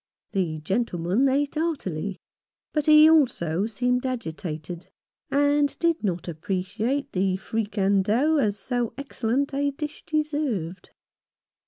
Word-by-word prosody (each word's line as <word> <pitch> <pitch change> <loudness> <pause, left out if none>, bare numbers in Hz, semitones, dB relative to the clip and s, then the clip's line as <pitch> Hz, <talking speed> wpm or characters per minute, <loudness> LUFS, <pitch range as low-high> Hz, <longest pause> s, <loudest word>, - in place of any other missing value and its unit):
The 175 -6 -1
gentleman 190 - +1
ate 280 +2 +1
heartily, 200 - -2 0.5
but 300 -1 0
he 305 0 +8
also 215 - +3
seemed 250 +3 0
agitated, 170 - -5 0.4
and 285 0 +2
did 335 -4 +1
not 180 -4 -2
appreciate 195 - -2
the 185 0 +1
fricandeau 210 +7 +1
as 210 -5 +1
so 245 -1 -2
excellent 275 0 -1
a 285 +1 +1
dish 295 +2 -6
deserved. 290 - -2
230 Hz, 110 wpm, -25 LUFS, 190-285 Hz, 0.5 s, he